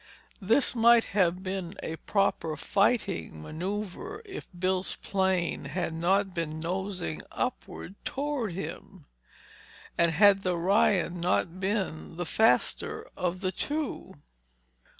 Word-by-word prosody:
This 225 +8 +3
might 235 -1 +6
have 185 -2 +2
been 190 -1 -4
a 160 - -3
proper 165 -4 0
fighting 200 - +1
maneuver 205 - -5
if 390 -1 -8
Bill's 185 +1 0
plane 190 -3 0
had 175 -3 -2
not 190 +4 +1
been 160 -2 -3
nosing 180 - -3
upward 185 - -4
toward 275 -8 -2
him; 185 -2 -7 0.9
and 170 -1 +5
had 195 +3 +6
the 180 -2 0
Ryan 180 -1 +2
not 175 0 0
been 190 -5 -2
the 175 - -2
faster 220 +7 +2
of 180 0 -2
the 185 -2 0
two. 290 - -3
190 Hz, 115 wpm, -29 LUFS, 170-205 Hz, 0.9 s, might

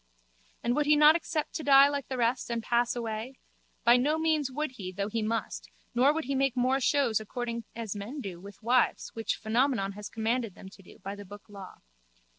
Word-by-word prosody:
And 240 +1 +1
would 295 -1 +1
he 300 - +6
not 300 +1 +7
accept 315 -2 -2
to 315 - -4
die 275 -1 +7
like 285 -1 -3
the 260 - -4
rest 245 +1 0
and 235 -1 -2
pass 240 +1 +1
away? 230 +2 -4 0.5
By 240 +1 +6
no 295 +5 +1
means 315 -3 +1
would 300 +2 -2
he 195 -8 -7
though 200 +2 -3
he 225 +1 -2
must 225 +1 -3 0.2
nor 255 +4 +4
would 320 +1 -2
he 275 - -3
make 270 -1 +1
more 255 +2 +2
shows 260 -4 +2
according 235 +1 -5
as 225 -3 -4
men 215 +9 -6
do 190 -9 -6
with 200 +2 -13
wives 245 +2 +2
which 225 -1 -2
Phenomenon 225 -2 0
has 205 +1 -8
commanded 225 -1 -2
them 190 - -11
to 195 - -16
do 180 - -16
by 195 - -4
the 205 0 -9
book 205 +1 -12
Law. 200 -3 -11
240 Hz, 215 wpm, -29 LUFS, 215-275 Hz, 0.5 s, not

